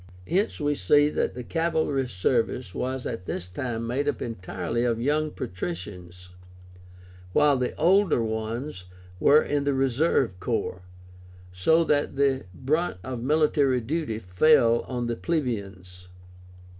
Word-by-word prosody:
Hence 195 +5 0
we 145 -1 +1
see 145 +6 +3
that - - -1
the 125 - -6
cavalry 160 -4 0
service 115 +1 -1
was 130 0 -3
at 115 -6 -5
this 90 - -3
time 115 +4 -4
made 130 +5 -1
up 140 - -3
entirely 95 0 -3
of 115 -2 0
young 150 +5 +1
patricians, 90 - -7 1.0
while 150 +3 +4
the 125 -1 -2
older 180 - +3
ones 110 -1 -4 0.3
were 150 +8 +6
in 145 -1 -1
the 140 -1 +1
reserve 135 - +1
corps, 90 0 -2 0.7
so 130 - +3
that 145 -3 0
the 135 -3 +1
brunt 145 - -1
of 130 -2 -5
military 145 -1 +2
duty 140 -1 -2
fell 115 +5 +4
on 125 -1 -3
the 120 0 -2
plebeians. 100 - -4
125 Hz, 130 wpm, -26 LUFS, 110-145 Hz, 1.0 s, were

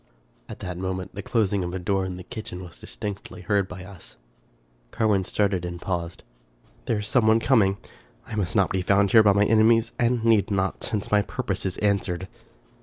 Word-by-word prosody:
At - - -9
that 90 -1 -5
moment, 95 0 -4
the 100 - -5
closing 100 -3 0
of 90 +1 -4
a - - -1
door 95 +1 0
in 90 -1 -5
the 90 - -8
kitchen 95 -4 -7
was 85 -2 -12
distinctly 105 -1 -7
heard 100 -2 +1
by 90 0 -9
us. 90 -11 -13 0.7
Carwin 105 -4 +1
started 95 -1 0
and 85 0 -5
paused. 85 -2 -4 0.3
" - - -32
There 115 - 0
is 105 0 -4
some 115 -1 +3
one 110 +1 +5
coming. 110 -6 +3 0.5
I - - -10
must 100 -3 -2
not 100 -3 +3
be 95 - 0
found 100 +1 +3
here 115 - +8
by 105 -2 +5
my 100 +1 +3
enemies, 115 +1 +4
and 120 -1 +1
need 110 -4 +4
not, 95 -2 -1
since 105 -2 -3
my 105 0 +5
purpose 100 - -3
is 90 - -4
answered." 100 -3 0
100 Hz, 200 wpm, -25 LUFS, 95-110 Hz, 0.7 s, here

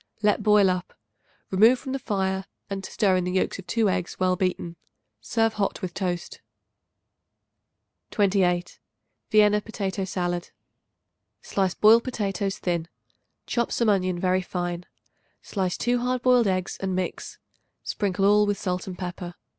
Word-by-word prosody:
Let 210 0 +3
boil 210 -2 +5
up; 180 -1 -4 0.6
remove 220 +7 +6
from 265 +2 -7
the 270 - -2
fire 190 -4 -1 0.3
and 195 -1 -3
stir 190 -1 +1
in 180 - 0
the 180 0 -2
yolks 190 - 0
of 185 - -10
2 225 -2 +2
eggs 185 -2 -2
well 185 -1 +2
beaten. 180 -2 -2 0.4
Serve 225 - 0
hot 205 0 -2
with 180 -2 -3
toast. 180 -2 -3 1.7
28. 185 -4 +1 0.5
Vienna 210 -1 +5
Potato 200 -3 -3
Salad. 175 -1 -2 0.9
Slice 190 -2 0
boiled 225 +2 +6
potatoes 200 -5 -2
thin; 170 -2 -2 0.6
chop 235 -1 -1
some 235 -2 +2
onion 185 -3 +1
very 185 +1 +2
fine; 175 -1 -4 0.6
slice 185 -3 -2
2 245 +1 +1
hard 250 0 -1
boiled 250 -3 +5
eggs 185 -1 -1
and 190 -1 -2
mix. 185 -1 -4 0.5
Sprinkle 195 -1 -1
all 210 +1 +5
with 205 -1 0
salt 180 0 -3
and 185 -1 -6
pepper. 175 -1 -6
190 Hz, 145 wpm, -25 LUFS, 180-210 Hz, 1.7 s, remove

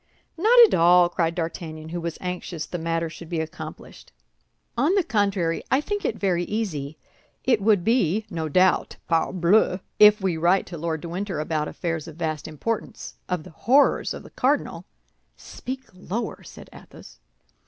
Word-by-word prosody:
"Not 440 +9 +4
at 435 - -2
all," 175 +1 +5
cried 170 -1 -1
D'Artagnan, 160 -2 -5
who 170 +1 -4
was 170 -1 -4
anxious 180 -3 -4
the 175 - -5
matter 165 0 -1
should 165 0 -10
be 170 -2 -2
accomplished; 160 0 -8 0.6
"on 290 +10 +2
the 390 - +3
contrary, 200 - 0
I 265 - +3
think 410 +7 -3
it - - -1
very 180 -3 0
easy. 160 -10 -3 0.5
It 240 -5 +2
would 205 -3 +3
be, 220 -3 +1
no 160 -2 -3
doubt, 185 +4 +2
parbleu, 180 +3 +2 0.2
if 210 0 +8
we 190 -4 -1
write 175 +4 +3
to 175 - -8
Lord 160 -1 -2
de 170 - -7
Winter 185 -1 -3
about 155 0 -1
affairs 165 -2 -4
of 160 - -10
vast 155 -3 -3
importance, 205 +9 -4 0.2
of 180 -3 -2
the - - -12
horrors 265 - +2
of - - -9
the - - -14
cardinal—" - - 0 0.5
"Speak 260 +1 -7
lower!" 205 +5 -5
said - - -12
Athos. - - -14
175 Hz, 165 wpm, -24 LUFS, 165-210 Hz, 0.6 s, if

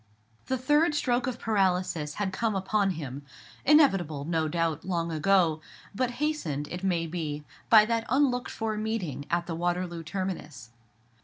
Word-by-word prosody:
The 260 - 0
third 295 +4 +3
stroke 255 -2 +1
of 250 -2 -2
paralysis 180 -8 0
had 195 -2 -2
come 220 +1 0
upon 195 +1 +1
him; 140 -3 -6 0.4
inevitable, 195 - +4
no 160 -1 0
doubt, 165 -1 -1
long 170 -2 -1
ago; 160 0 +2 0.3
but 250 +4 0
hastened, 215 - -2
it 180 +1 -5
may 175 -3 +1
be, 155 -3 -4 0.3
by 215 -2 +8
that 230 0 -1
unlooked 255 -1 +2
for 220 -1 -3
meeting 210 - -3
at 170 0 0
the 170 - -4
Waterloo 175 0 -2
terminus. 160 - -5
185 Hz, 150 wpm, -28 LUFS, 160-225 Hz, 0.4 s, by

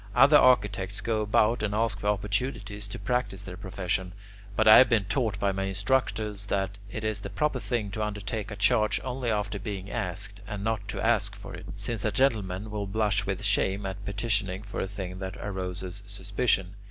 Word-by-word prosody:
Other 140 +4 +8
architects 105 -6 +3
go 110 -2 0
about 105 +2 +3
and 105 -1 -1
ask 110 -2 +1
for 105 - -3
opportunities 105 0 -1
to 100 - -6
practise 125 -6 -1
their 95 -2 -7
profession; 95 -1 -3 0.4
but 110 +1 +3
I 110 - +11
have 130 - +6
been 115 -4 +3
taught 110 -3 0
by 100 -1 +2
my 95 0 -2
instructors 105 0 0
that 100 0 -1
it 110 +1 -5
is 110 -2 -1
the 100 - -6
proper 135 +6 0
thing 105 -2 -2
to 110 - -3
undertake 105 0 -3
a 105 - -5
charge 105 +2 +3
only 125 -1 -2
after 105 -1 -1
being 100 -1 -5
asked, 100 +2 -3
and 105 -2 -4
not 110 -2 -1
to 110 - -3
ask 105 -3 +2
for 100 - -9
it; - - -8
since 100 +1 -3
a 110 - +1
gentleman 105 -4 +1
will 105 -1 -3
blush 105 -1 +1
with 95 +2 -2
shame 100 -1 +1
at 95 +1 -5
petitioning 100 -2 -1
for 105 - -4
a - - -1
thing 95 -2 -6
that 95 -1 -5
arouses 95 -1 -5
suspicion. 100 -2 0
105 Hz, 195 wpm, -28 LUFS, 95-110 Hz, 0.4 s, I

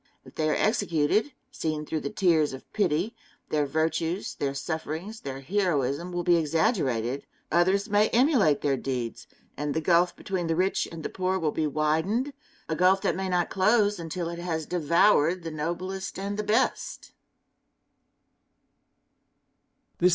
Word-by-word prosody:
If - - -14
they 155 -1 0
are - - +2
executed, 205 - +1 0.2
seen 155 -1 -3
through 155 - -2
the 140 - -4
tears 160 -6 +2
of 130 - -9
pity, 190 +2 0 0.3
their 150 -2 +1
virtues, 160 +4 -1
their 140 -1 -2
sufferings, 160 +8 -4
their 135 -1 -6
heroism, 170 -2 0
will 175 0 -2
be 175 0 +4
exaggerated; 145 - 0 0.2
others 190 +5 +3
may 210 0 +3
emulate 235 - +3
their 140 -2 +1
deeds, 125 -3 -4 0.3
and 145 -1 -3
the - - +2
gulf 175 +1 +3
between 185 -3 -3
the 165 - +1
rich 185 +3 +1
and 165 -1 -8
the - - -3
poor 185 0 -1
will 160 -4 0
be 155 0 0
widened 160 - 0 0.3
a 160 - -1
gulf 185 +3 +4
that - - +1
may 190 0 -2
not 175 -1 0
close 205 0 +3
until 170 +1 -4
it 170 0 -6
has 165 -3 -2
devoured 170 +1 +3
the 165 - -5
noblest 175 +6 -4
and 200 +1 -3
the 210 - -2
best. 215 +5 -1
170 Hz, 150 wpm, -27 LUFS, 155-190 Hz, 0.3 s, be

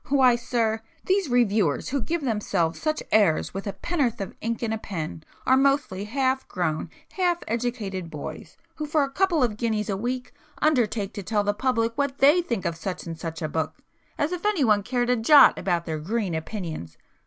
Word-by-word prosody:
Why 260 -3 +5
sir, 230 -2 0 0.2
these 380 -4 +1
reviewers 210 - +2
who 280 0 -1
give 335 +6 -2
themselves 200 -8 0
such 310 -1 -1
airs 200 -8 +3
with 195 +2 -5
a 200 - -2
pennorth 275 -10 -1
of 195 - -5
ink 230 +1 -2
and 220 -1 0
a 220 - -3
pen, 160 -6 -5 0.2
are 260 - +5
mostly 270 -8 +1
half 265 +3 0
grown 160 -4 -2 0.2
half 355 -2 0
educated 220 -7 -3
boys 155 0 -8 0.2
who 305 -1 -3
for 300 0 +2
a 275 - -3
couple 350 -3 +2
of 215 -4 0
guineas 220 -2 -1
a - - 0
week 250 +4 -3 0.3
undertake 230 -8 +1
to 205 - -5
tell 210 +1 0
the 205 0 +1
public 230 0 0
what 280 -1 0
they 295 +6 +6
think 235 - -3
of 170 -1 -1
such 180 +3 -5
and 165 -1 -6
such 165 -1 -5
a - - 0
book, 160 +1 -2 0.4
as 295 +3 0
if 360 -1 -4
anyone 275 - +3
cared 245 +3 0
a - - +4
jot 270 +4 +7
about 175 -3 0
their 160 -2 -3
green 200 +3 -2
opinions! 160 - -5
225 Hz, 195 wpm, -25 LUFS, 190-270 Hz, 0.4 s, jot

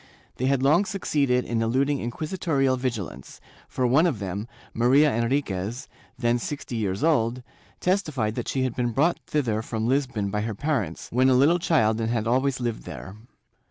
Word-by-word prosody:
They 130 - 0
had 135 -1 +1
long 155 +9 +4
succeeded 145 - 0
in 115 -1 -1
eluding 135 +5 +1
inquisitorial 135 +1 -1
vigilance, 125 -7 -5 0.3
for 130 - -1
one 140 +8 +4
of 150 -9 -1
them, 100 +2 -4 0.3
Maria 135 +5 +4
Enriquez, 115 -1 -1 0.3
then 120 -1 +1
sixty 140 -1 -5
years 100 -1 -2
old, 125 -6 +2 0.4
testified 155 - 0
that - - -4
she 130 - 0
had 130 -3 -2
been 120 -2 -1
brought 160 +7 +2
thither 120 -8 0
from 110 0 -3
Lisbon 125 -7 0
by 105 0 -1
her 110 0 -3
parents, 115 - -2
when 130 +2 +3
a 130 - +4
little 150 +7 +4
child 115 -10 +2
and 110 - -1
had 115 -2 -1
always 130 +3 +1
lived 120 -2 -2
there. 95 - -8
125 Hz, 170 wpm, -25 LUFS, 115-140 Hz, 0.4 s, long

